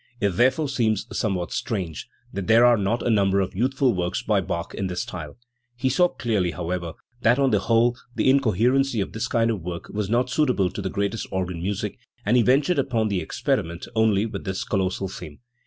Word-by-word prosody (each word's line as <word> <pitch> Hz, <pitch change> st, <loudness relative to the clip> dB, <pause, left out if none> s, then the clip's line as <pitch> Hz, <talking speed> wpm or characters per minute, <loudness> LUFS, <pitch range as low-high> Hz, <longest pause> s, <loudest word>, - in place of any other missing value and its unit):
It 100 Hz, -, +2 dB
therefore 130 Hz, -, +2 dB
seems 115 Hz, -6 st, 0 dB
somewhat 95 Hz, -5 st, -1 dB
strange 90 Hz, -8 st, -3 dB, 0.2 s
that 95 Hz, -2 st, -4 dB
there 115 Hz, +2 st, +6 dB
are 120 Hz, -1 st, +6 dB
not 110 Hz, +3 st, -1 dB
a -, -, +2 dB
number 100 Hz, -2 st, +3 dB
of 95 Hz, -1 st, -1 dB
youthful 130 Hz, +5 st, +1 dB
works 90 Hz, +5 st, -2 dB
by 105 Hz, -4 st, +2 dB
Bach 85 Hz, -1 st, -4 dB
in 95 Hz, -, -2 dB
this 90 Hz, -1 st, -3 dB
style. 75 Hz, -5 st, -8 dB, 0.4 s
He 125 Hz, +2 st, 0 dB
saw 180 Hz, +8 st, +4 dB
clearly, 110 Hz, -, -1 dB
however, 85 Hz, -1 st, -4 dB, 0.3 s
that 120 Hz, +2 st, +4 dB
on 135 Hz, -2 st, +2 dB
the 105 Hz, -, +3 dB
whole 115 Hz, +4 st, +2 dB, 0.2 s
the -, -, +1 dB
incoherency 130 Hz, 0 st, +3 dB
of 100 Hz, -, -2 dB
this 115 Hz, +2 st, -3 dB
kind 115 Hz, -1 st, +2 dB
of 105 Hz, -5 st, -3 dB
work 85 Hz, 0 st, -6 dB
was 105 Hz, -1 st, -3 dB
not 120 Hz, +2 st, +1 dB
suitable 125 Hz, -, +2 dB
to -, -, -5 dB
the 95 Hz, -, -2 dB
greatest 100 Hz, +3 st, -2 dB
organ 90 Hz, -2 st, -3 dB
music, 100 Hz, +2 st, -3 dB, 0.3 s
and 110 Hz, +5 st, +3 dB
he 125 Hz, -, +6 dB
ventured 140 Hz, +7 st, +3 dB
upon 115 Hz, -5 st, 0 dB
the 95 Hz, -3 st, 0 dB
ex 80 Hz, -, -8 dB
periment 85 Hz, +1 st, -1 dB
only 110 Hz, -2 st, +3 dB
with 100 Hz, -4 st, -5 dB
this 95 Hz, 0 st, -3 dB
colossal 95 Hz, -1 st, -1 dB
theme. 90 Hz, -6 st, -9 dB
105 Hz, 205 wpm, -24 LUFS, 95-120 Hz, 0.4 s, there